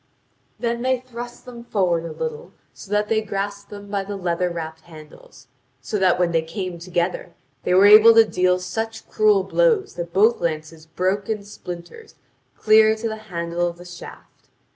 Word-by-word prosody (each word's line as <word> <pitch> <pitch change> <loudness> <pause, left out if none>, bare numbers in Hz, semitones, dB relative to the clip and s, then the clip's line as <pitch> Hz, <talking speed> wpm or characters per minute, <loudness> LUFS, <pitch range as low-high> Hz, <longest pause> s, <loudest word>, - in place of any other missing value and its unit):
Then 235 0 -2
they 260 0 +1
thrust 240 -1 -9
them 240 -2 -10
forward 180 -7 0
a - - -6
little, 475 0 -6 0.2
so - - -13
that 210 0 +1
they 220 0 +1
grasped 200 -1 -5
them 205 -1 -10
by 200 -1 -1
the 200 +1 -6
leather 180 -1 -1
wrapped 160 -2 -6
handles, 160 - -15 0.3
and - - -31
so 210 - -2
that 185 -2 +3
when 175 -1 +1
they 165 -1 +2
came 175 +2 -6
together 175 0 -3 0.3
they 180 - +1
were 190 +2 +6
able 215 +2 +9
to 225 0 +7
deal 180 -3 +1
such 220 +5 -5
cruel 210 -3 +3
blows 440 - +1
that 170 -1 -6
both 215 +6 +3
lances 155 -1 -4
broke 190 +5 -2
in 215 -2 -2
splinters 185 - -10 0.4
clear 220 0 +5
to 225 +1 -4
the 220 -1 -4
handle 170 0 -2
of 170 0 -6
the 175 - -13
shaft. 175 0 -13
195 Hz, 185 wpm, -22 LUFS, 175-220 Hz, 0.4 s, able